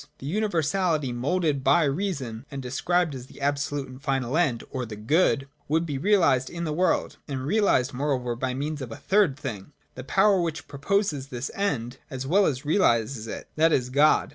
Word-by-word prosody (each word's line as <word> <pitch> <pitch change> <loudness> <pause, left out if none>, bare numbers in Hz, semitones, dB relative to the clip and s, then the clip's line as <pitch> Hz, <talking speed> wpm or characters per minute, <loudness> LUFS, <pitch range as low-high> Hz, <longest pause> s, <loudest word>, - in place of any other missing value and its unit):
The - - -10
universality 165 -5 0
moulded 145 +3 0
by 145 +6 +4
Reason, 140 - -2
and 140 - -6
described 160 +6 0
as 130 -1 -8
the - - -15
absolute 145 0 -1
and 130 +1 -12
final 135 -2 -1
end 145 -9 +1
or 130 - -3
the 110 -3 -6
Good, 135 - +2 0.2
would 160 +3 +1
be 145 -4 -3
realised 145 -9 +3
in 170 0 -5
the 155 -2 -2
world, 180 +4 +1
and 135 -3 -4
realised 150 - +2
moreover 125 -3 -1
by 125 +1 -2
means 145 +2 -3
of 125 -3 -6
a - - -5
third 190 -9 +2
thing, 130 -3 -6 0.2
the 130 - -8
power 195 +7 +3
which 165 -3 -3
proposes 145 -1 -1
this 130 0 -5
End 135 - -2
as 130 -3 -5
well 195 +8 +4
as 135 0 -2
realises 120 - +2
it, - - -6
— - - -40
that 165 +1 +4
is, 125 -4 +1
God. 145 +3 +4
140 Hz, 190 wpm, -26 LUFS, 130-165 Hz, 0.2 s, by